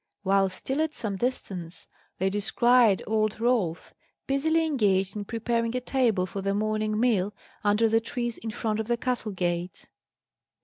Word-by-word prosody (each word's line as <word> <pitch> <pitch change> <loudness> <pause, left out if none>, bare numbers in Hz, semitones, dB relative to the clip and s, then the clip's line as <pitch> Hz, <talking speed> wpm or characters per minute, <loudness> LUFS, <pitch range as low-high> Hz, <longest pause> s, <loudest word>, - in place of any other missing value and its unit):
While 195 0 +3
still 265 +10 -2
at 315 -1 -1
some 205 -3 -3
distance, 185 -8 -3 0.3
they 190 +1 0
descried 225 +1 +4
old 215 -1 0
Rolf, 225 -9 0 0.3
busily 315 +4 +1
engaged 200 -10 +1
in 205 -1 -4
preparing 230 +1 -1
a - - +1
table 245 -7 +1
for 195 +2 -5
the 195 +1 0
morning 215 0 0
meal, 210 -5 +1 0.3
under 210 +2 +3
the 225 +1 +2
trees 240 -1 -3
in 225 - -5
front 215 0 -2
of 220 - -3
the 240 0 +1
castle 245 -3 -1
gates. 175 -1 -3
215 Hz, 160 wpm, -27 LUFS, 195-240 Hz, 0.3 s, descried